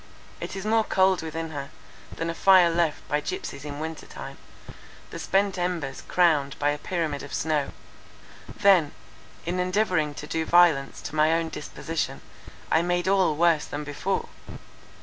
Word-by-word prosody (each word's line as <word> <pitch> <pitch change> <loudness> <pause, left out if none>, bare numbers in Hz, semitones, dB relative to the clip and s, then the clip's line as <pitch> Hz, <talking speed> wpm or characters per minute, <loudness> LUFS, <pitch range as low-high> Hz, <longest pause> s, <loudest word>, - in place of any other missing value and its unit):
It - - -6
is 195 +1 -5
more 220 +1 +3
cold 190 -3 +2
within 160 0 -5
her, 140 -2 -6 0.5
than 165 +1 -2
a - - -5
fire 180 -1 +6
left 165 -2 0
by 150 0 0
gypsies 370 - -5
in 145 0 -6
winter 160 0 -6
time, - - -9 0.7
the - - -6
spent 195 -1 +1
embers 170 -7 -2
crowned 155 -6 +2
by 145 0 +1
a 145 - -4
pyramid 160 -5 -2
of 145 - -6
snow. 150 -3 0 0.8
Then, 180 -7 +3 0.5
in 175 +2 -2
endeavouring 180 -5 +1
to 150 - -7
do 160 +1 -2
violence 160 -5 +3
to - - -6
my 155 +1 +4
own 165 0 0
disposition, - - -4 0.5
I 160 - +4
made 175 +1 0
all 190 -5 +3
worse 165 -1 +3
than 145 +1 -5
before. 150 +7 -3
165 Hz, 160 wpm, -26 LUFS, 150-180 Hz, 0.8 s, fire